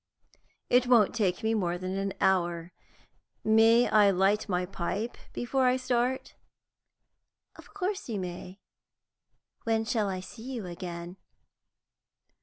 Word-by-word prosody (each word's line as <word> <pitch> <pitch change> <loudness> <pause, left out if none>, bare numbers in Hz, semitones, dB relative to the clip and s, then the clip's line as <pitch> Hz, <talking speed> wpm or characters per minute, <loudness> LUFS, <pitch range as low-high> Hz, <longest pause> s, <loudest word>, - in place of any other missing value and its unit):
It 250 0 +3
won't 235 -5 +5
take 200 -6 0
me 220 0 +1
more 175 -5 0
than 185 +1 -4
an 195 0 -2
hour. 175 -2 +1 0.7
May 225 +2 +5
I 210 -2 +5
light 195 +3 +2
my 180 -1 0
pipe 195 +5 -3 0.2
before 255 +1 0
I 250 +1 +3
start?" 255 0 -1 1.2
"Of - - -16
course 395 -3 -3
you 215 -3 -2
may. 185 +1 -7 1.0
When 225 -1 +1
shall 220 -3 0
I 185 -1 -3
see 230 +7 -9
you 225 -5 -5
again?" 175 0 -7
210 Hz, 125 wpm, -29 LUFS, 185-240 Hz, 1.2 s, won't